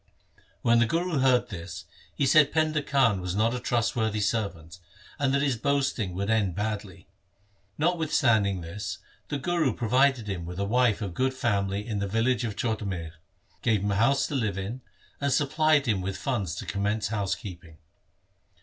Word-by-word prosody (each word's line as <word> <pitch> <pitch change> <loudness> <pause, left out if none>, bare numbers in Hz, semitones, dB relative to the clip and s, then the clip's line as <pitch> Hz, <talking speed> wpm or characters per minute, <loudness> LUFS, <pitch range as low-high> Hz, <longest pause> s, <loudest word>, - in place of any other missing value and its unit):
When 115 0 +4
the 120 - +3
Guru 165 +1 0
heard 130 -2 +3
this 90 -2 -7 0.3
he 140 - +1
said 145 +1 +5
Painda 155 -1 +1
Khan 115 -9 +2
was 90 0 -3
not 110 +3 +2
a 125 - -2
trust 120 -1 0
worthy 110 -2 0
servant, 100 -6 -2 0.4
and 140 -2 +2
that 140 +1 +2
his 135 -5 +1
boasting 130 -8 0
would 100 +2 -2
end 105 -5 +1
badly. 105 -3 -4 0.7
Notwithstanding 130 - +2
this, 90 +5 -5 0.3
the 145 - -2
Guru 155 -3 0
provided 125 0 +2
him 95 -4 -3
with 90 +1 -7
a 100 - -1
wife 115 0 +2
of 95 -4 -4
good 130 +5 0
family 100 -4 0
in 110 -4 -3
the 100 - -1
village 115 +5 +1
of 110 -3 -3
Chhotamir, 100 -8 -3 0.5
gave 110 -5 +1
him 100 - 0
a - - 0
house 120 +7 +3
to - - -5
live 110 -8 -1
in, 105 +7 -5 0.4
and 140 0 0
supplied 155 +1 +3
him 105 -5 +1
with 95 +1 -3
funds 100 - -2
to - - -6
commence 105 +1 -1
housekeeping. 95 -6 -4
110 Hz, 175 wpm, -27 LUFS, 100-130 Hz, 0.7 s, said